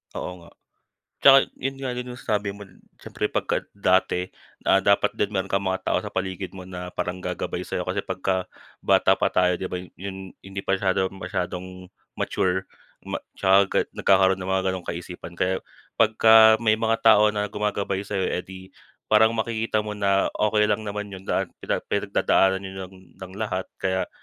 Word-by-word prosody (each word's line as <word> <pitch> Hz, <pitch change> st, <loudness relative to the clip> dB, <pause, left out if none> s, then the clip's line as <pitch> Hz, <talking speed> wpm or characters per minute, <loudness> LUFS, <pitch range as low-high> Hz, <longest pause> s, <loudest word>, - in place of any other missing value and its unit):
Oo 90 Hz, -1 st, -6 dB
nga. 85 Hz, -, -15 dB, 0.7 s
Tsaka 135 Hz, 0 st, +9 dB, 0.2 s
'yon 135 Hz, +1 st, -2 dB
nga 135 Hz, -2 st, -3 dB
din 125 Hz, 0 st, -5 dB
yung 125 Hz, -, -8 dB
sabi 105 Hz, -4 st, -1 dB
mo 100 Hz, +1 st, -8 dB, 0.3 s
siyempre -, -, -4 dB
pagka -, -, -1 dB, 0.2 s
dati 95 Hz, -1 st, +1 dB, 0.3 s
na 95 Hz, -, +4 dB
dapat 100 Hz, +1 st, +3 dB
din 105 Hz, -, -1 dB
meron 95 Hz, -2 st, -1 dB
kang 100 Hz, 0 st, 0 dB
mga 95 Hz, -1 st, -2 dB
tao -, -, +1 dB
sa -, -, -6 dB
paligid 95 Hz, 0 st, -3 dB
mo 95 Hz, -1 st, -10 dB
na 90 Hz, -1 st, -7 dB
parang 90 Hz, +1 st, -4 dB
gagabay 90 Hz, 0 st, -3 dB
sa'yo. 90 Hz, 0 st, -4 dB
Kasi 95 Hz, +2 st, -1 dB
pagka 95 Hz, 0 st, -2 dB, 0.3 s
bata -, -, +4 dB
pa -, -, +1 dB
tayo, 90 Hz, 0 st, +2 dB
'di 90 Hz, +1 st, -4 dB
ba, 90 Hz, -, -3 dB
yu 90 Hz, 0 st, -9 dB
yun, 95 Hz, -1 st, -8 dB
hindi 95 Hz, 0 st, -7 dB
pa -, -, +1 dB
syadong 95 Hz, -1 st, 0 dB
masyadong 90 Hz, -1 st, -4 dB, 0.5 s
mature 95 Hz, 0 st, 0 dB, 0.4 s
ma -, -, -3 dB, 0.2 s
tsaka 95 Hz, 0 st, +3 dB
nagkakaroon 95 Hz, -1 st, +4 dB
ng 90 Hz, -, -4 dB
mga 95 Hz, 0 st, +1 dB
gano'ng 95 Hz, -2 st, -6 dB
kaisipan. 90 Hz, 0 st, -7 dB
Kaya 95 Hz, +1 st, 0 dB, 0.4 s
pagka 110 Hz, 0 st, +7 dB
may 110 Hz, -1 st, +2 dB
mga 115 Hz, 0 st, +1 dB
tao 105 Hz, -1 st, +7 dB
na 105 Hz, -1 st, -1 dB
gumagabay 100 Hz, -2 st, -2 dB
sa'yo, 100 Hz, -2 st, -2 dB
eh -, -, -1 dB
'di, 95 Hz, 0 st, -12 dB, 0.3 s
parang 110 Hz, +1 st, +4 dB
makikita 110 Hz, -1 st, -1 dB
mo 105 Hz, -, -4 dB
na 100 Hz, -1 st, +2 dB
okey 105 Hz, 0 st, +2 dB
lang 105 Hz, 0 st, 0 dB
naman 105 Hz, 0 st, -4 dB
'yon, 95 Hz, -, -8 dB
lahat 95 Hz, -2 st, -1 dB
pinag -, -, -2 dB
pinagdadaanan 95 Hz, 0 st, +1 dB
yun 95 Hz, -1 st, -7 dB, 0.2 s
ng 95 Hz, 0 st, -11 dB
lahat 95 Hz, -4 st, -3 dB
kaya 95 Hz, 0 st, -1 dB
95 Hz, 180 wpm, -24 LUFS, 95-105 Hz, 0.7 s, Tsaka